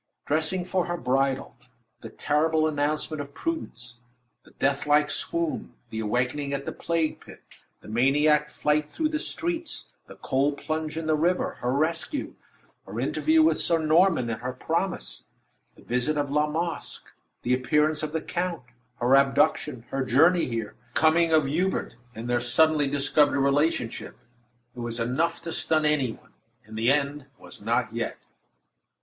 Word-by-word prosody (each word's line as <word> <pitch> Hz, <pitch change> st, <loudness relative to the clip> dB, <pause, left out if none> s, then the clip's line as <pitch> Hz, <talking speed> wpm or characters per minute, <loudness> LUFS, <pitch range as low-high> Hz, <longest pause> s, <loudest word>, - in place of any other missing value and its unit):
Dressing 160 Hz, +4 st, 0 dB
for 185 Hz, -1 st, 0 dB
her 175 Hz, 0 st, -2 dB
bridal; 135 Hz, -1 st, 0 dB, 0.4 s
the -, -, -9 dB
terrible 155 Hz, +1 st, +1 dB
announcement 150 Hz, 0 st, -1 dB
of 140 Hz, 0 st, -10 dB
Prudence; 125 Hz, -, -5 dB, 0.4 s
the -, -, -19 dB
death 140 Hz, +1 st, -1 dB
like 150 Hz, 0 st, +4 dB
swoon; 170 Hz, +1 st, -2 dB, 0.2 s
the 110 Hz, -, -4 dB
awakening 125 Hz, +6 st, -1 dB
at 140 Hz, 0 st, -3 dB
the -, -, -3 dB
plague 165 Hz, -2 st, -1 dB
pit; -, -, -14 dB, 0.4 s
the -, -, -14 dB
maniac 150 Hz, +6 st, +3 dB
flight 150 Hz, 0 st, 0 dB
through 310 Hz, -, -1 dB
the 305 Hz, -1 st, -1 dB
streets; 335 Hz, +1 st, -3 dB, 0.2 s
the -, -, -12 dB
cold 140 Hz, +2 st, 0 dB
plunge 155 Hz, +1 st, -3 dB
in 165 Hz, -, -3 dB
the 155 Hz, 0 st, +2 dB
river; 175 Hz, +4 st, +1 dB
her 125 Hz, -, 0 dB
rescue; 160 Hz, -, -1 dB, 0.5 s
her -, -, -5 dB
interview 315 Hz, 0 st, +3 dB
with 320 Hz, -, +3 dB
Sir 170 Hz, -, +3 dB
Norman, 160 Hz, -3 st, +3 dB
and 115 Hz, -, -5 dB
her 125 Hz, +1 st, -3 dB
promise; 170 Hz, +8 st, -3 dB, 0.5 s
the -, -, -18 dB
visit 125 Hz, +5 st, 0 dB
of 145 Hz, -1 st, -1 dB
La 150 Hz, +1 st, +2 dB
Masque; 165 Hz, +2 st, -4 dB, 0.4 s
the 125 Hz, -, +1 dB
appearance 150 Hz, +4 st, +2 dB
of 155 Hz, -1 st, -3 dB
the 160 Hz, 0 st, -2 dB
count; 175 Hz, -4 st, -3 dB, 0.4 s
her 125 Hz, +2 st, +4 dB
abduction; 135 Hz, -3 st, +2 dB
her 135 Hz, 0 st, 0 dB
journey 160 Hz, +8 st, +4 dB
here; 115 Hz, -4 st, -4 dB, 0.2 s
the -, -, +2 dB
coming 165 Hz, +1 st, +4 dB
of 155 Hz, -2 st, +4 dB
Hubert, 175 Hz, +3 st, -1 dB, 0.2 s
and 115 Hz, +2 st, -6 dB
their 120 Hz, 0 st, +1 dB
suddenly 150 Hz, +4 st, +3 dB
discovered 145 Hz, +1 st, +2 dB
relationship. 140 Hz, -3 st, 0 dB, 0.6 s
It -, -, -9 dB
was 120 Hz, 0 st, -4 dB
enough 130 Hz, +8 st, 0 dB
to 165 Hz, -, -5 dB
stun 155 Hz, -1 st, +1 dB
any 145 Hz, -5 st, +2 dB
one; -, -, -20 dB, 0.3 s
and 110 Hz, +1 st, -11 dB
the 115 Hz, +4 st, +3 dB
end 145 Hz, -1 st, -1 dB
was -, -, -13 dB
not -, -, 0 dB
yet. -, -, -3 dB
150 Hz, 160 wpm, -26 LUFS, 130-160 Hz, 0.6 s, like